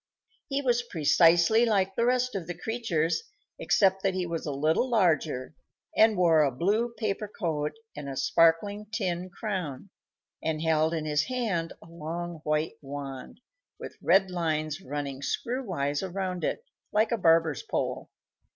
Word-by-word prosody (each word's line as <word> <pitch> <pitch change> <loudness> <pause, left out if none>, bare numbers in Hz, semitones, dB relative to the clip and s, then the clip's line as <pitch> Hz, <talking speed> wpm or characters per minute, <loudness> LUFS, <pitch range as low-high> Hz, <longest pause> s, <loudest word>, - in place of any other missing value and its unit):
He 280 0 -1
was 245 -2 +2
precisely 170 +1 +4
like 195 -4 +2
the 235 +4 +1
rest 250 0 +1
of 185 -5 -4
the 175 -1 -5
creatures, 175 -7 -1 0.4
except 195 - +3
that 190 -1 0
he 185 -1 -1
was 165 -2 -4
a - - -1
little 155 - +1
larger, 160 - +1 0.4
and 220 -2 +5
wore 165 -3 +5
a 145 - +3
blue 210 - 0
paper 210 0 -2
coat 160 -7 -2 0.2
and 145 -1 -6
a 135 - -6
sparkling 200 +6 +2
tin 185 -4 -2
crown, 185 - -5 0.5
and 160 -1 -1
held 160 0 +2
in 155 -1 -3
his 150 -1 +1
hand 215 -10 -2
a - - -15
long 170 +1 -6
white 150 +1 -1
wand, 140 - -7 0.4
with - - -8
red 190 +2 +4
lines 155 -2 -1
running 140 -3 -5
screw 250 - -2
wise 145 - -1
around 185 -2 -3
it, 465 - -2 0.3
like 215 +1 +2
a - - +3
barber's 165 - +3
pole. - - -3
175 Hz, 155 wpm, -28 LUFS, 155-210 Hz, 0.5 s, and